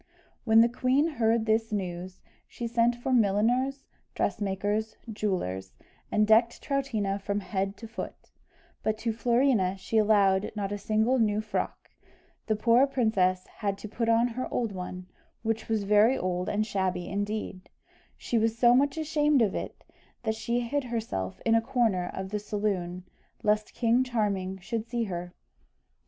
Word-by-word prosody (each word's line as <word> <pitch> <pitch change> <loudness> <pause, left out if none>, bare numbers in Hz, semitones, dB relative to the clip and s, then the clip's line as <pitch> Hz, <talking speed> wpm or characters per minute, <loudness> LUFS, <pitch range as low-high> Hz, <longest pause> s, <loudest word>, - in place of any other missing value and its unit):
When 225 -1 +6
the 230 - +6
queen 255 +4 +2
heard 230 -7 +1
this 225 0 +1
news, 185 -2 -4 0.3
she 240 - -6
sent 235 +1 +2
for 240 +2 -2
milliners, 245 +5 +2 0.3
dressmakers, 205 +2 -1 0.2
jewellers, 95 - -2 0.4
and 215 - +3
decked 225 +2 +4
Troutina 220 -8 -1
from 200 +1 -1
head 195 0 -2
to 230 - -9
foot; 220 - -8 0.5
but 215 0 0
to 225 0 -2
Florina 235 -5 +2
she 220 +4 0
allowed 200 -2 +3
not 200 -1 -3
a 205 - -3
single 220 +5 +1
new 210 -2 +2
frock 215 -1 -4 0.6
The 215 - +2
poor 235 +5 +4
princess 200 -9 +1
had 200 -2 -4
to 215 - -8
put 225 +2 -2
on 230 +2 +4
her 255 +2 -5
old 230 -3 -1
one, 180 -1 -6 0.4
which 225 0 -2
was 220 -2 +1
very 210 +5 +4
old 180 0 -2
and 215 +1 0
shabby 190 -4 -1
indeed, 205 -1 -4 0.5
she 235 - 0
was 225 +1 +1
so 240 0 +6
much 275 +3 +2
ashamed 300 -4 +2
of 200 - 0
it, - - -6 0.4
that 220 -2 0
she 235 +2 -1
hid 265 +3 -2
herself 220 - -3
in 225 - +3
a 225 - +4
corner 225 -7 0
of 190 0 -5
the 210 - -1
saloon, 200 -4 -2 0.4
lest 210 0 +1
King 240 +1 +3
Charming 200 -6 -1
should 220 +4 -4
see 235 0 -1
her. 175 -3 -5
220 Hz, 160 wpm, -28 LUFS, 195-235 Hz, 0.6 s, When